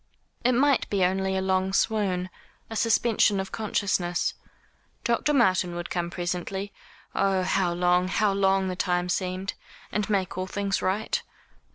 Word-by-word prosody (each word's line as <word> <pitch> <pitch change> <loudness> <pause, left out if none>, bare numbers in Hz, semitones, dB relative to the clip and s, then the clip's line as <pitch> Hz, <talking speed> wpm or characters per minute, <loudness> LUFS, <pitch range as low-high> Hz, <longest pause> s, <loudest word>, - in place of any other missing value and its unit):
It 250 - +4
might 275 +2 +3
be 195 -3 +2
only 190 +1 0
a 190 - -1
long 190 0 +1
swoon, 195 -4 +1 0.4
a - - -4
suspension 225 -2 +3
of 190 - -4
consciousness. 190 -5 0 0.7
Dr. 235 +5 +1
Martin 185 -9 +3
would 175 0 -5
come 170 -1 -1
presently 180 +3 -3 0.4
oh, 195 -1 +2
how 185 -1 +1
long, 180 +1 +2
how 200 +1 +2
long 195 -1 +2
the 185 - -2
time 180 0 0
seemed 185 +2 -2 0.4
and 210 -1 -1
make 190 -3 0
all 185 - -2
things 200 0 -1
right. 200 +4 0
190 Hz, 150 wpm, -26 LUFS, 180-205 Hz, 0.7 s, It